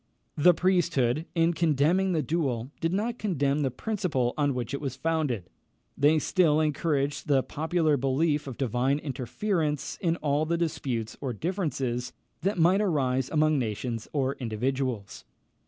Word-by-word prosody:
The 175 +3 +5
priesthood, 165 -6 +1
in 165 0 +3
condemning 170 +4 +2
the 160 -4 +1
duel, 135 -7 -1
did 165 - 0
not 225 +5 -1
condemn 145 -8 0
the 135 - +1
principle 135 - -1
on 145 -3 +1
which 125 0 -3
it 140 - -3
was 135 -3 -3
founded. 135 - -1 0.5
They 150 +3 +4
still 155 0 +3
encouraged 150 -1 0
the 135 -3 +3
popular 160 -1 0
belief 145 +3 +1
of 130 - -6
divine 130 +2 +1
interference 150 - -2
in 170 -2 +1
all 150 -1 0
the 170 +1 +1
disputes 135 -9 -2
or 130 -4 -2
differences 135 - -2 0.3
that 195 +2 0
might 180 +4 +4
arise 135 -9 +1
among 155 -1 +2
nations 115 0 -3
or 135 -2 0
individuals. 125 -1 -3
145 Hz, 145 wpm, -27 LUFS, 130-165 Hz, 0.5 s, The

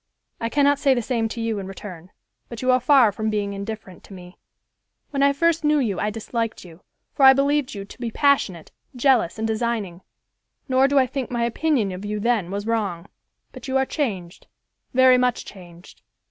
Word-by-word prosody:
I 230 - -2
cannot 285 +1 +2
say 275 -2 +3
the 240 - 0
same 230 -2 -1
to 235 - -6
you 225 -2 -2
in 190 - -6
return, 185 -3 -10 0.4
but 235 0 -8
you 255 - +3
are 255 - +4
far 255 -4 +5
from 220 +2 -3
being 205 -1 -2
indifferent 200 -2 -8
to - - -13
me. 180 0 -13 0.7
When 280 -1 -1
I 280 0 +5
first 335 +3 +1
knew 300 0 +3
you 220 -10 -1
I 210 - 0
disliked 225 0 -4
you, 170 0 -15 0.3
for - - -5
I 265 0 +9
believed 280 -2 0
you 200 -1 -6
to 200 - -15
be 240 -2 -3
passionate, 225 - 0 0.2
jealous 245 -8 +2
and 220 0 -2
designing; 220 -5 -2 0.7
nor 260 +1 +3
do 280 0 +1
I 265 - +5
think 260 0 -5
my 240 -1 -1
opinion 235 -3 0
of 185 +2 -7
you 210 0 -3
then 220 -5 0
was 200 +2 -4
wrong; 205 -7 -2 0.4
but - - -10
you 265 0 0
are 265 - +2
changed, 200 - -4 0.4
very 255 0 +5
much 250 -1 0
changed. 175 -2 -14
230 Hz, 200 wpm, -22 LUFS, 200-265 Hz, 0.7 s, I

